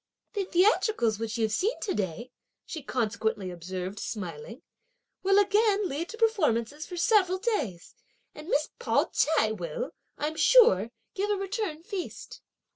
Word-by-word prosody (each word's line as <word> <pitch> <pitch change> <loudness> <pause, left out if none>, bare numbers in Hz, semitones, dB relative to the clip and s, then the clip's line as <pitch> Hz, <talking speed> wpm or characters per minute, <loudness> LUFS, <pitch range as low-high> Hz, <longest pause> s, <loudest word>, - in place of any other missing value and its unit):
"The 405 -3 -1
theatricals 360 - +2
which 225 0 -3
you've 220 -2 +1
seen 415 - 0
to 395 - -1
day," 210 +6 -3 0.3
she 320 - -6
consequently 220 -6 -1
observed 185 +3 -5
smiling, 205 - -6 0.6
"will 390 +1 +3
again 410 0 +3
lead 320 +4 -4
to 450 - -8
performances 305 - +1
for 355 - -7
several 370 0 +3
days, 300 - -2 0.4
and 300 +1 -11
Miss 300 -3 +1
Pao - - +1
ch'ai 295 -9 +3
will, - - -4 0.3
I'm 310 +2 -3
sure, 230 - +6 0.2
give 400 +2 -1
a 415 - +2
return 390 -5 -3
feast." 390 -2 -6
310 Hz, 140 wpm, -28 LUFS, -, 0.6 s, sure